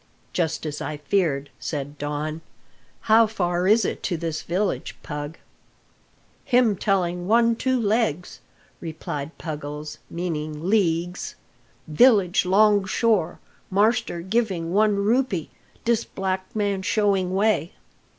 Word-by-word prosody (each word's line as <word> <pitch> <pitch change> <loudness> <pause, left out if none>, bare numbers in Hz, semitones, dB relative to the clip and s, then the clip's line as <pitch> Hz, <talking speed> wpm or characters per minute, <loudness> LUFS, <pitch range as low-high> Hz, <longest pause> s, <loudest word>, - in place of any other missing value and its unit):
"Just 160 -2 -1
as 150 -1 -4
I 155 - -4
feared," 150 -3 0
said 145 -1 -5
Don. 150 +2 -3 0.6
"How 225 +1 +5
far 180 -4 -1
is 215 0 +5
it - - -3
to 175 - -1
this 160 -1 -3
village, 185 +3 -2
Pug!" 145 +1 -6 1.1
"Him 245 -4 +3
telling 180 -2 0
one 230 +2 +4
two 260 +2 0
legs," 210 -6 0 0.4
replied 160 -2 -6
Puggles, 150 -1 -6
meaning 155 -2 -4
leagues. 180 -4 0 0.5
"Village 195 +2 +4
'long 205 +1 +5
shore; 215 -3 +1 0.3
marster 210 -2 +1
giving 190 -4 -1
one 210 +1 +4
rupee, 205 - 0 0.3
dis'black 190 -5 -1
man 200 -2 0
showing 195 -2 +1
way." 200 -5 +1
185 Hz, 110 wpm, -24 LUFS, 160-215 Hz, 1.1 s, How